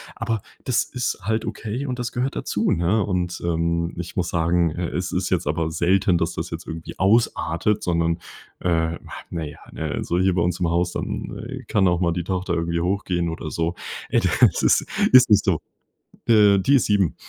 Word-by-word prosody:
aber 115 Hz, -3 st, -2 dB, 0.2 s
das 125 Hz, -2 st, +1 dB
ist 125 Hz, -3 st, -3 dB
halt 110 Hz, +2 st, -1 dB
okay 115 Hz, +6 st, -4 dB
und 125 Hz, -, -3 dB
das 120 Hz, -1 st, -3 dB
gehört 130 Hz, +2 st, -2 dB
dazu, -, -, -1 dB
ne, 90 Hz, +6 st, +2 dB
und, 90 Hz, -2 st, -2 dB
ähm, 85 Hz, 0 st, 0 dB
ich 85 Hz, 0 st, -6 dB
muss 90 Hz, -2 st, -1 dB
sagen, 85 Hz, 0 st, +2 dB
äh, 85 Hz, +2 st, -3 dB
es 90 Hz, 0 st, -3 dB
ist 90 Hz, +1 st, -1 dB
jetzt 85 Hz, -5 st, 0 dB
aber 80 Hz, +2 st, -1 dB
selten, 90 Hz, +2 st, +2 dB
dass 80 Hz, -, -1 dB
das -, -, -5 dB
jetzt -, -, -6 dB
irgendwie 80 Hz, 0 st, -7 dB
ausartet, 100 Hz, -2 st, +2 dB
sondern, 85 Hz, -1 st, 0 dB, 0.4 s
äh, 80 Hz, -1 st, 0 dB, 0.3 s
na 85 Hz, -2 st, -3 dB
ja, 75 Hz, -, -8 dB
ne? -, -, -5 dB
Also, 85 Hz, -, -1 dB
hier 95 Hz, -1 st, +2 dB
bei 85 Hz, -, +2 dB
uns 90 Hz, 0 st, -1 dB
im 85 Hz, -2 st, +1 dB
Haus, 85 Hz, +1 st, +1 dB
dann -, -, -5 dB, 0.2 s
kann 95 Hz, -3 st, +3 dB
auch 85 Hz, -1 st, +2 dB
mal 85 Hz, -, +2 dB
die 85 Hz, -1 st, -2 dB
Tochter 95 Hz, 0 st, -2 dB
irgendwie 85 Hz, 0 st, -1 dB
hochgehen 90 Hz, -2 st, -1 dB
oder 80 Hz, -1 st, -5 dB
so: 85 Hz, +2 st, -1 dB, 0.4 s
„Ey, -, -, +3 dB
das -, -, +3 dB
ist -, -, +4 dB, 0.3 s
ist 130 Hz, -1 st, +8 dB
nicht 105 Hz, -1 st, +5 dB
so.” 90 Hz, -5 st, +1 dB, 0.7 s
Äh, 105 Hz, -3 st, +6 dB
die 135 Hz, +9 st, +3 dB
ist 130 Hz, -, +3 dB
7, 100 Hz, -5 st, +2 dB
90 Hz, 200 wpm, -23 LUFS, 85-105 Hz, 0.7 s, ist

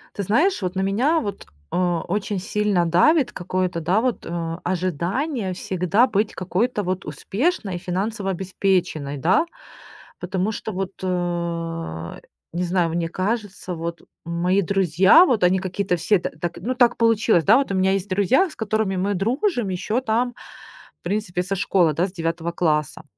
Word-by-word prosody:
Ты 200 Hz, -, -2 dB
знаешь, 300 Hz, -, +2 dB
вот 185 Hz, 0 st, -3 dB
на 190 Hz, -, 0 dB
меня 245 Hz, +12 st, +2 dB
вот, 205 Hz, -7 st, -5 dB, 0.3 s
э, -, -, -3 dB
очень 180 Hz, +3 st, -1 dB
сильно 200 Hz, -2 st, +1 dB
давит 255 Hz, -, +4 dB
какое-то, 185 Hz, -1 st, -2 dB
да, 180 Hz, +6 st, +1 dB
вот, 250 Hz, -1 st, -1 dB
э, 165 Hz, -1 st, -3 dB
ожидание 185 Hz, -, -1 dB
всегда 185 Hz, +5 st, +1 dB
быть 210 Hz, -3 st, 0 dB
какой-то 205 Hz, +5 st, -1 dB
вот 185 Hz, 0 st, -3 dB
успешной 195 Hz, -, -2 dB
и -, -, -2 dB
финансово 195 Hz, +3 st, -2 dB
обеспеченной, 180 Hz, -6 st, -1 dB
да? 185 Hz, -, +3 dB, 0.7 s
Потому 185 Hz, +3 st, -1 dB
что 220 Hz, -, -5 dB
вот, 190 Hz, +1 st, -3 dB
э 170 Hz, -, -3 dB, 0.3 s
не 175 Hz, +2 st, -1 dB
знаю, 175 Hz, -1 st, +1 dB
мне 170 Hz, 0 st, -1 dB
кажется, 195 Hz, -1 st, -3 dB
вот 170 Hz, +1 st, -5 dB, 0.2 s
мои 175 Hz, +3 st, +1 dB
друзья, 190 Hz, -, +5 dB
вот 245 Hz, -, +1 dB
они 185 Hz, +1 st, +3 dB
какие-то 190 Hz, 0 st, -1 dB
все 185 Hz, +4 st, +2 dB
т -, -, -3 dB
так 175 Hz, -, -3 dB
ну 255 Hz, +3 st, -3 dB
так 245 Hz, -1 st, +4 dB
получилось, 225 Hz, -6 st, +3 dB
да. 215 Hz, -, +7 dB
Вот 275 Hz, -6 st, 0 dB
у -, -, 0 dB
меня 190 Hz, 0 st, +3 dB
есть 195 Hz, +1 st, -2 dB
друзья, 205 Hz, -, +3 dB
с -, -, -11 dB
которыми 215 Hz, -3 st, -1 dB
мы 195 Hz, +3 st, 0 dB
дружим 240 Hz, -, 0 dB
еще 210 Hz, +6 st, -1 dB
там 245 Hz, 0 st, 0 dB, 0.7 s
в -, -, -60 dB
принципе, 180 Hz, -1 st, -2 dB
со 195 Hz, +2 st, -2 dB
школы, 180 Hz, -4 st, +2 dB
да, 175 Hz, +5 st, +1 dB
с -, -, -10 dB
9 165 Hz, -1 st, -2 dB
класса. 155 Hz, -4 st, 0 dB
190 Hz, 165 wpm, -22 LUFS, 175-215 Hz, 0.7 s, да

